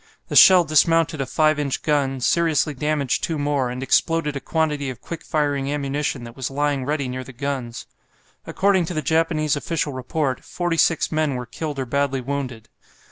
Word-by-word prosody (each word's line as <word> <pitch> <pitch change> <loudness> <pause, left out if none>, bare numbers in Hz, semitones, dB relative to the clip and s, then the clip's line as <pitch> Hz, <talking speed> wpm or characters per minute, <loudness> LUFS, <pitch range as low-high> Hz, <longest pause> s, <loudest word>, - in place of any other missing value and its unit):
The - - -3
shell 185 -2 +8
dismounted 160 -1 +2
a 135 - -3
5 155 +1 +2
inch 140 -2 -2
gun, 140 -3 0
seriously 160 +1 +2
damaged 145 -1 -1
two 165 - -1
more, 145 -3 0
and 125 +1 -5
exploded 150 +2 +1
a - - -2
quantity 150 -3 -1
of 125 -4 -7
quick 165 -1 -8
firing 145 -2 -1
ammunition 140 -2 -2
that 115 0 -10
was 130 -2 -4
lying 140 -1 -1
ready 145 -1 -1
near 130 +1 -5
the 135 - -11
guns. 130 -2 -4 0.6
According 190 -2 +2
to 175 - -5
the 155 - -2
Japanese 160 0 +1
official 150 0 -2
report, 130 +1 -2
forty 175 -2 -2
six 165 0 +2
men 155 -3 0
were 125 0 -4
killed 145 +5 -5
or 135 - -2
badly 140 +1 0
wounded. 125 -4 -5
145 Hz, 185 wpm, -22 LUFS, 135-155 Hz, 0.6 s, shell